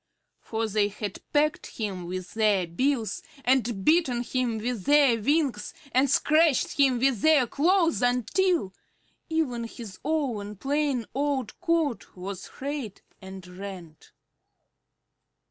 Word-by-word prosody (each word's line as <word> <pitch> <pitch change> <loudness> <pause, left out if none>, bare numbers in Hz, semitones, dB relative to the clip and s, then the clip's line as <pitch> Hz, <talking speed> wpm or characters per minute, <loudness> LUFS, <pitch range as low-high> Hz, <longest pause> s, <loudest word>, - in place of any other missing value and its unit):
For 225 0 -3
they 210 -1 +2
had 205 -1 -6
pecked 300 0 0
him 190 -5 -4
with 185 +1 -6
their 210 -4 +2
bills 225 +4 -1 0.2
and 240 -6 +1
beaten 290 -7 +3
him 245 -2 -1
with 225 -3 -3
their 280 -6 +4
wings 290 +2 0 0.2
and 265 +2 +3
scratched 305 +1 +3
him 265 -3 +4
with 255 -4 +1
their 310 -5 +5
claws 330 - +2
until 250 - +1 0.6
even 270 -8 -1
his 225 -4 -9
own 245 -9 -2
plain 275 +1 -1
old 275 -3 -2
coat 335 -7 -1
was 190 +1 -7
frayed 275 -7 -6 0.2
and 190 -1 -9
rent. 180 -4 -10
245 Hz, 120 wpm, -27 LUFS, 205-290 Hz, 0.6 s, their